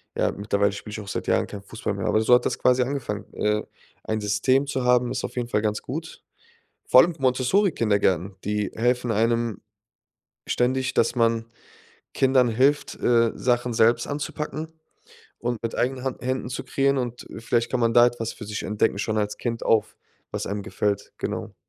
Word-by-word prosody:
Ja, - - +1
mittlerweile 100 0 0
spiele 105 +1 -8
ich 110 - -5
auch 100 - -11
seit - - -4
Jahren - - +2
kein 100 -1 -8
Fußball 110 0 -4
mehr, 100 -1 -4
aber 110 - +3
so 115 - +4
hat 125 - +1
das - - 0
quasi 125 0 +4
angefangen. 125 -6 -4
Äh, 105 0 0 0.4
ein 110 0 -2
System 130 +7 +2
zu 130 -1 -2
haben, 125 0 +3
ist 125 -1 -3
auf - - -5
jeden 120 -1 -3
Fall 105 - +1
ganz 105 0 -1
gut. 160 +5 -7 0.7
Vor 130 - +8
allem 170 0 0
Montessori-Kindergärten, 125 - +1
die 105 -1 -1
helfen 120 +1 +1
einem 115 0 0 0.9
ständig, 130 +1 0
dass 115 +2 +2
man 115 -1 +2 0.7
Kindern 130 -2 +3
hilft, 135 +6 +1
äh, 115 -1 +3
Sachen 120 -1 0
selbst 115 +2 +3
anzupacken 150 +2 -4 0.7
und 120 -1 -3
mit 115 - -2
eigenen 130 +1 -1
Hand 130 -3 -4
Händen 130 0 -2
zu 125 - -4
kreieren 140 0 +1
und 125 -2 -4
vielleicht 115 +1 0
kann 130 - 0
man 115 -1 +2
da 120 0 +7
etwas 115 -2 -4
für 105 - -9
sich 105 +1 -4
entdecken 105 -1 0
schon 110 +1 -1
als 105 -1 -1
Kind 115 -1 -3
auf 110 -1 +2 0.4
was - - -3
einem 100 0 -3
gefällt, 100 0 -2
genau. - - -4
120 Hz, 185 wpm, -24 LUFS, 105-130 Hz, 0.9 s, Vor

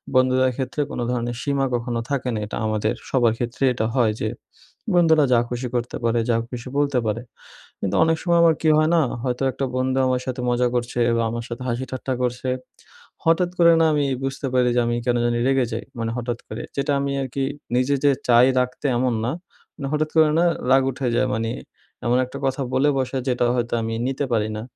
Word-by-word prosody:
বন্ধুদের 130 0 +4
ক্ষেত্রে 135 +2 -2
কোনো 120 - -3
ধরনের 120 -1 -2
সীমা 140 -1 0
কখনো 120 -1 -1
থাকে 135 -2 -1
না 110 - -2
এটা 105 - -6
আমাদের 110 +1 0 0.2
সবার 120 -4 +3
ক্ষেত্রেই 125 +2 0
এটা 110 -2 -1
হয় 120 -4 +3
যে 110 - 0 0.6
বন্ধুরা 160 -4 +5
যা 120 - +5
খুশি 125 +1 -3
করতে 120 0 -2
পারে 115 0 +2
যা 115 - +3
খুশি 125 0 -7
বলতে 140 -3 +2
পারে 110 +2 -1 0.6
কিন্তু 95 - -2
অনেক 160 0 +2
সময় 170 -1 +2
আমার 165 -2 +5
কি 160 - +3
হয় 155 +1 +3
না 165 - +4 0.2
হয়তো 125 0 -1
একটা 135 - -3
বন্ধু 130 +1 0
আমার 125 0 0
সাথে 130 0 -3
মজা 125 0 +2
করছে 120 0 -2 0.2
বা, 115 - +1
আমার 115 +1 -4
সাথে 120 +2 -6
হাসি 125 +2 -2
ঠাট্টা 130 0 -3
করছে। 125 +1 -1 0.8
হঠাৎ 170 +2 +3
করে 170 0 +7
না - - +5
আমি 145 -1 +1 0.2
বুঝতে 135 +1 -3
পারি 125 -1 +3
যে - - +4
আমি 120 0 0
কেন 120 -1 +2
জানি 120 0 +1
রেগে 135 -2 +3
যাই 115 - -3 0.2
মানে 115 0 -2
হঠাৎ 120 0 -3
করে। 110 +2 -6
যেটা 140 +1 0
আমি 140 0 -1
আরকি 135 +1 -3 0.3
নিজে 130 +3 +2
যে 140 - +6 0.2
চাই 120 +1 +6
রাগতে 125 +3 -2
এমন 125 0 +1
না, 125 - 0 0.4
মানে 135 - -5
হঠাৎ 155 0 0
করে 155 -1 +6
না 175 - +4 0.3
রাগ 135 0 +6
উঠে 130 0 -3
যায় 130 - +2
মানি 115 +1 -1 0.5
এমন 120 +1 +3
একটা 130 +2 -8
কথা 135 +1 -1
বলে 135 +3 +3
বসে 130 0 -1
যেটা 125 -1 +1
হয়তো 120 -1 -2
আমি 115 0 -3
নিতে 135 +2 -1
পারি 110 -1 +1
না। 110 - -4
125 Hz, 210 wpm, -22 LUFS, 120-135 Hz, 0.8 s, করে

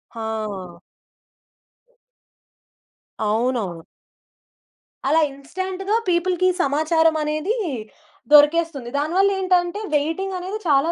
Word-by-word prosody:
ఆ! 215 -6 -5 2.5
అవునవును. 215 -7 -1 1.3
అలా 320 +2 +4
ఇన్స్టాంట్‌గా 375 +8 -3
పీపుల్‌కి 360 +1 +2
సమాచారమనేది 315 - +1 0.8
దొరికేస్తుంది. 295 -3 +4
దానివల్లేంటంటే, 370 +3 +1 0.2
వెయిటింగనేది 370 +6 -2
చాలా 290 +3 +3
320 Hz, 55 wpm, -22 LUFS, 275-370 Hz, 2.5 s, అలా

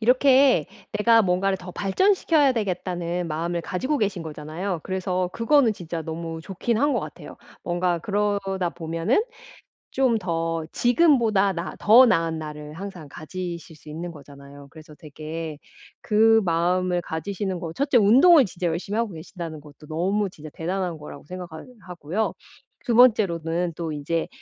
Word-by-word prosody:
이렇게 255 - +4 0.3
'내가 225 +2 +4
뭔가를 190 +1 +1
더 180 0 -9
발전시켜야 300 - +2
되겠다.'는 180 -5 -3
마음을 170 +3 -2
가지고 260 - -2
계신 195 -6 -1
거잖아요. 160 +4 -5
그래서 185 -1 -2
그거는 240 0 +3
진짜 170 -3 -6
너무 165 +1 -5
좋긴 195 +6 -2
한 290 - +3
것 290 - +1
같아요. - - -9 0.3
뭔가 175 0 0
그러다 195 -2 -1
보면은 165 - 0 0.7
좀 255 -4 +2
더 165 -3 -2
지금보다 240 - +3
나 170 +1 -5
더 230 +5 +7
나은 165 -8 +1
나를 150 -1 -8
항상 180 -3 -8
가지실 170 +3 -7
수 150 0 -17
있는 165 +3 -6
거잖아요. 140 -1 -13
그래서 155 -1 -14
되게 155 +1 -7 0.5
그 225 +1 +4
마음을 180 +1 +1
가지시는 185 +3 -4
거 165 -1 -5
1 280 - -1
째 270 - +3
운동을 265 - +7
진짜 180 -3 -4
열심히 175 +6 -2
하고 230 -5 -1
계신다는 165 -1 -8
것도 150 0 -15
너무 195 +6 0
진짜 155 -4 -11
대단한 180 0 -3
거라고 145 -1 -10
생각하 175 -1 -8 0.2
하고요. 180 +5 -3 0.5
2 235 - 0
번째로는 175 -8 +3
또 165 0 -4
인제 150 +3 -2
180 Hz, 325 characters per minute, -24 LUFS, 165-210 Hz, 0.7 s, 더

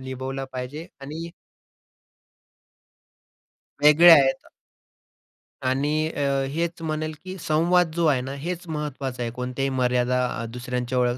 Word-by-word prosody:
निभवला 130 +1 -5
पाहिजे. 130 +6 -6
आणि 160 +5 -7 2.5
वेगळे 155 +4 +8
आहेत. 135 -4 +4 1.2
आणि 140 +3 +1 0.2
अ, 145 - -4 0.3
हेच 165 +2 -3
म्हणेल 155 0 -3
की 185 +1 -7
संवाद 165 +2 +2
जो 170 -1 +1
आहे 135 -4 +3
ना, 135 +2 -5
हेच 175 +5 -5
महत्त्वाचं 140 -5 -4
आहे. 115 - -3
कोणत्याही 125 +2 -3
मर्यादा 125 -1 +1 0.2
अ, - - -4
दुसऱ्यांच्या 125 0 -1
135 Hz, 115 wpm, -24 LUFS, 125-160 Hz, 2.5 s, वेगळे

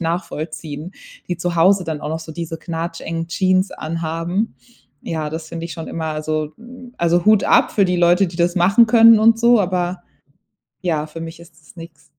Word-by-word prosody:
nachvollziehen, 160 -1 -5 0.4
die 175 - -2
zu 175 0 -3
Hause 185 +2 +4
dann 155 -2 -4
auch - - -5
noch 160 +1 -3
so 160 0 -9
diese 165 0 -5
knatschengen 165 0 -5
Jeans 185 +1 +1
anhaben. 165 +5 -3 0.5
Ja, 155 -2 -3
das 160 0 -6
finde 165 0 -6
ich 170 - -8
schon 165 - -7
immer 160 -1 -4
also, 155 0 -3
hm, 250 +1 -13
also, 170 +1 +1
Hut 215 -1 +5
ab - - +4
für 200 - +3
die 180 - 0
Leute, 175 +2 +4
die 170 - -9
das 175 +1 +1
machen 200 +7 +5
können 230 0 +7
und 225 +1 +5
so, 235 -1 +5
aber 180 -1 -2 0.8
ja, 160 -5 -1
für 160 +2 -10
mich 165 0 -8
ist 170 0 -17
das 150 - -20
nix. 165 -2 -12
170 Hz, 190 wpm, -19 LUFS, 160-185 Hz, 0.8 s, können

